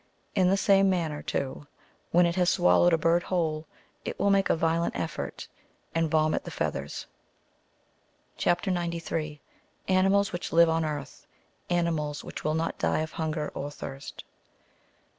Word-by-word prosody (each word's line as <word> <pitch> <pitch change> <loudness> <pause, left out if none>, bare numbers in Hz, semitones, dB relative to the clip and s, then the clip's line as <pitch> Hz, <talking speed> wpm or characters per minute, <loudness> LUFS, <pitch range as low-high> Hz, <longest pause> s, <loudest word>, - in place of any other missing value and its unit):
In 185 -1 +3
the 195 - +3
same 195 -1 +4
manner, 165 -5 -1
too, 140 +1 -3 0.4
when 175 +1 +5
it 170 0 0
has 180 -1 +3
swallowed 90 - +4
a 165 - +4
bird 165 +2 +3
whole, 160 -4 -1 0.4
it - - -5
will 200 - +2
make 195 -1 +3
a - - +4
violent 165 +1 0
effort, 160 -2 -4 0.5
and 165 -1 +1
vomit 155 0 +2
the - - -7
feathers. - - -3 1.3
CHIP. 175 0 +1
93. 170 -4 -2 0.5
AXIilALS 195 +2 +3
WHICH 175 - -4
LIVE 170 0 +6
ON 165 0 +1
EARTH 145 -3 -6 0.2
— - - -39
ANIIUiALS 165 -4 0
WHICH - - -8
WILL 155 0 0
NOT 165 +1 -2
DIE - - +1
OF 160 - -4
HUNGER 155 -1 -2
OK 145 - -4
THIRST. 135 -1 -8
165 Hz, 155 wpm, -28 LUFS, 155-175 Hz, 1.3 s, LIVE